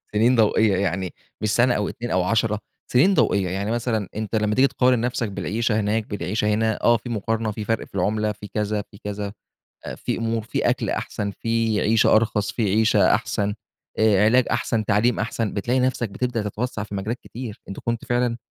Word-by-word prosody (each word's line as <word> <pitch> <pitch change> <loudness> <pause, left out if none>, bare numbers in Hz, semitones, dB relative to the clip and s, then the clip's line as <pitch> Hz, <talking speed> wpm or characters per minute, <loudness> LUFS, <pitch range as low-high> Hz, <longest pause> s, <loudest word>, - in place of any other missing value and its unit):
سنين 120 +4 +4
ضوئية، 110 -2 +3
يعني 95 -1 -1 0.3
مش 105 - 0
سنة 125 +1 +4
أو 105 - -1
2 120 0 -6
أو 95 -1 +2
10، 105 +1 +1 0.3
سنين 165 +11 +5
ضوئية، 95 - +2
يعني 100 +4 -2
مثلًا 115 -4 -1
أنت 110 +1 -3
لمّا 105 0 +1
تيجي 135 +2 +5
تقارن 125 -2 +2
نفسك 120 -3 -1
بالعيشة 110 +3 -1
هناك، 105 +1 0
بالعيشة 105 +1 -2
هنا، 110 0 0
آه 120 0 +5
في 120 +3 -9
مقارنة، 110 0 -1
في 105 0 -5
فرق 115 -1 -1
في - - -17
العملة، 105 +3 +1
في 105 0 -9
كذا، 105 -1 -1
في 100 - -14
كذا، 105 0 -4 0.5
آآ، - - -5
في - - -3
أمور 115 0 -1
في 115 - 0
أكل - - -1
أحسن 100 -1 -3
في 115 -1 0
عيشة 110 0 +4
أرخص 105 -2 +1
في 115 - -2
عيشة 110 +2 +4
أحسن 105 0 -1 0.5
آآ، 105 -2 +4
علاج 125 +3 +4
أحسن، 110 -2 0
تعليم 110 +3 +2
أحسن، 115 -1 -2
بتلاقي 120 +6 0
نفسك 125 -3 0
بتبدأ 120 +2 -2
تتوسع 110 0 -3
في 100 -1 -7
مجالات 110 +5 -3
كتير، 120 -2 -8
أنت 100 - -6
كنت 115 -1 -3
فعلًا 120 -1 0
110 Hz, 195 wpm, -23 LUFS, 105-115 Hz, 0.5 s, سنين